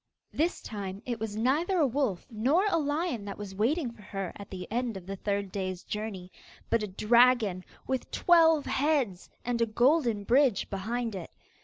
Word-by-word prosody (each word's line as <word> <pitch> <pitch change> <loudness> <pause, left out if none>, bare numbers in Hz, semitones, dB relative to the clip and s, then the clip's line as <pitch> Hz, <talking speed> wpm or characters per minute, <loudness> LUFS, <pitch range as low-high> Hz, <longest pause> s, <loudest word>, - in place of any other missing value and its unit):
This 330 +4 0
time 200 -1 -6
it 240 -2 -3
was 220 -1 -4
neither 290 - +1
a 315 - +4
wolf 255 -8 -1
nor 265 - +2
a 335 -5 +2
lion 295 - -1
that 200 - -6
was 205 -2 -7
waiting 245 - 0
for 230 -2 -16
her 195 -2 -5
at 200 - -10
the 185 -1 -7
end 235 -2 -1
of 180 - -10
the 195 +1 -5
third 200 0 -2
day's 185 -2 -4
journey, 205 -4 -5 0.4
but 230 - +3
a 210 - -2
dragon 215 -1 +3 0.2
with 260 -1 -2
twelve 325 -3 +4
heads, 270 - 0 0.2
and 240 -1 -1
a 230 - +3
golden 240 -1 +2
bridge 250 -1 +3
behind 225 +4 -2
it. 185 -4 -6
230 Hz, 180 wpm, -29 LUFS, 200-275 Hz, 0.4 s, a